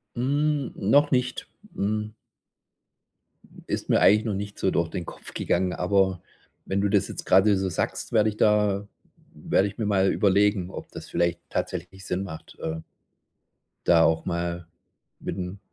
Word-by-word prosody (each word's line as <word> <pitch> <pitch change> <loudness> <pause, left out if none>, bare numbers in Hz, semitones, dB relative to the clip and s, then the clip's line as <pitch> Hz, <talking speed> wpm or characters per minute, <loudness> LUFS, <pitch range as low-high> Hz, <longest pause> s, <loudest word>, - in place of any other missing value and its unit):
Hm, 145 +2 0
noch 145 +9 +3
nicht, 125 -1 0 0.3
hm. 105 +2 -2 1.5
Ist - - -3
mir - - +4
eigentlich 105 +3 +5
noch 110 - -1
nicht 100 +1 -5
so 95 - +2
durch 85 -1 0
den 90 -4 -5
Kopf - - -10
gegangen, 90 +1 0
aber 95 -1 +1 0.4
wenn 100 +1 0
du 100 - +1
das 100 -1 +2
jetzt - - -7
gerade 95 +2 +5
so 95 0 -1
sagst, 85 - -3
werde 110 -1 +4
ich 105 - -7
da 105 -2 +2 0.5
werde 100 - +2
ich 100 - -9
mir 110 - -1
mal 95 -2 +3
überlegen, 100 -2 +2
ob - - -8
das - - -9
vielleicht 85 0 0
tatsächlich 90 +2 -4
Sinn 90 +2 -2
macht, 80 -5 -9
äh 80 0 -3 1.1
da 85 -1 +6
auch 80 0 +2
mal 85 0 -3 0.5
mit - - -5
'n 90 +1 -5
100 Hz, 160 wpm, -26 LUFS, 90-105 Hz, 1.5 s, da